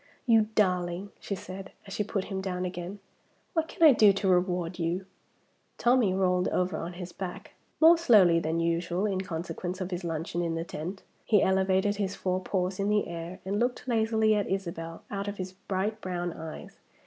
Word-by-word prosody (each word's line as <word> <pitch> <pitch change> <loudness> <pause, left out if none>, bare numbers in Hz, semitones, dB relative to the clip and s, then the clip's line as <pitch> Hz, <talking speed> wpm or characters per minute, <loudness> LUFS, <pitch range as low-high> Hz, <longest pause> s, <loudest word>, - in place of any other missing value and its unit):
"You 225 -3 +5
darling!" 180 -1 +1
she 200 - -4
said, 190 +1 -9
as 195 - -8
she 210 - 0
put 200 -2 -2
him 190 -1 -4
down 185 -1 -2
again, 180 +2 -5 0.6
"what 325 -1 +1
can 335 - -2
I 305 -4 +10
do 215 -3 +7
to 195 0 -1
reward 180 -1 +1
you?" 175 +3 -1 0.7
Tommie 240 -6 +3
rolled 180 -1 +2
over 180 0 0
on 170 +2 -5
his 175 0 -7
back 180 0 -7 0.3
more 330 +1 +7
slowly 195 - +6
than 165 0 -1
usual, 170 +3 0
in 195 -3 0
consequence 180 0 -4
of 185 0 -4
his 180 0 -3
luncheon 165 +1 -2
in 165 -1 -1
the 165 - -2
tent. 175 +3 -6 0.2
He 210 -3 +4
elevated 190 +1 +2
his 200 -1 -2
four 185 0 -1
paws 185 0 -1
in 200 +1 +1
the 210 -1 +2
air 170 +1 -6
and 200 +2 -1
looked 245 +1 -1
lazily 220 -2 +3
at 205 -2 0
Isabel 170 -3 -4
out 200 0 -3
of 205 0 -4
his 185 0 -4
bright 195 +3 -3
brown 175 -2 -3
eyes. 160 -1 -9
185 Hz, 190 wpm, -28 LUFS, 175-205 Hz, 0.7 s, I